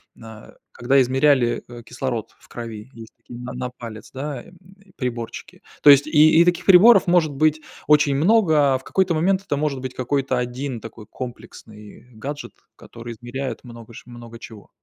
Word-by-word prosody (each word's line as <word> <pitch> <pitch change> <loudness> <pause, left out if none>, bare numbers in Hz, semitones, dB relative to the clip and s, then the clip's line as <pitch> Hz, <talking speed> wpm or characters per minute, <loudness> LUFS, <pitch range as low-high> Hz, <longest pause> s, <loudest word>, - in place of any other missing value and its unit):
на 110 -1 -14 0.2
когда 135 +3 +2
измеряли, 130 -1 +2
э, 120 -1 -11
кислород 120 -2 -5
в - - -22
крови. 115 -1 -9
Есть 115 -1 -13
такие 120 - -12
на 125 +1 -7
на 125 0 -5
палец, 115 -4 -11
да, 135 -1 -6
э, - - -17 0.5
приборчики. 120 -3 -6 0.2
То 150 - +8
есть 140 +1 +7
и, 155 +1 +5
и - - +5
таких 175 0 0
приборов 200 +6 +7
может 170 -4 +2
быть 155 +2 +1 0.3
очень 150 -2 +4
много, 155 -6 +3
а - - +1
в 130 - -16
какой-то 190 -2 0
момент 185 +4 +1
это 145 -7 -3
может 140 -3 -2
быть 130 -1 -6
какой-то 130 0 -1
один 125 +1 -4
такой 115 -1 -11
комплексный 110 -2 -11
гаджет, 140 +7 -7 0.2
который 115 0 -10
измеряет 120 +4 -6
много 115 -1 -12
ш - - -12
много 120 -1 -12
чего. 110 -4 -13
130 Hz, 175 wpm, -21 LUFS, 120-150 Hz, 0.5 s, То